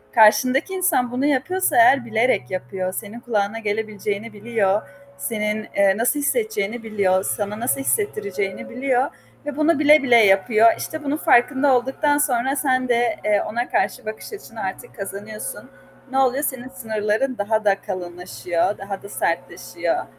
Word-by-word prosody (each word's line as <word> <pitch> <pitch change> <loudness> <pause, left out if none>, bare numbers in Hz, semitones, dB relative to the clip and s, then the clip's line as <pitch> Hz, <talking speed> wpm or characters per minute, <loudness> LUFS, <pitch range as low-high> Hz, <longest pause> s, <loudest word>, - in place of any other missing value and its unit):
karşındaki 255 - +4
insan 355 -10 +1
bunu 255 +3 -1
yapıyorsa 295 +7 +1
eğer 280 -8 +6
bilerek 225 - +1
yapıyor. 185 0 -4
Senin 220 +3 -6
kulağına 225 -2 -1
gelebileceğini 215 0 -3
biliyor. 210 -2 0 0.4
Senin, 215 -1 -2
eee, 200 -1 +4
nasıl 245 +6 +1
hissedeceğini 280 - -1
biliyor. 200 -4 +1
Sana 210 +1 -3
nasıl 250 +3 0
hissettireceğini 410 - -2
biliyor 260 +1 0 0.4
ve 295 -1 -5
bunu 310 0 +2
bile 300 -1 +6
bile 245 -3 +4
yapıyor. 215 +1 +5
İşte, 315 -1 -6
bunun 290 +2 -1
farkında 265 +1 +3
olduktan 270 +4 +1
sonra 265 -2 +1
sen 255 -3 +1
de, 240 -1 +2
eee, 210 -1 +3
ona 240 +3 -3
karşı 195 - -1
bakış 215 - -7
açını 230 - -9
artık 190 - -6
kazanıyorsun. 205 +2 -7 0.4
Ne 265 - -1
oluyor? 265 +2 +2
Senin 260 -3 -3
sınırların 225 0 -2
daha 215 +1 -1
da 195 -1 +2
kalınlaşıyor, 180 0 -3
daha 195 0 -6
da 200 - -10
sertleşiyor. - - -2
230 Hz, 145 wpm, -22 LUFS, 205-270 Hz, 0.4 s, eğer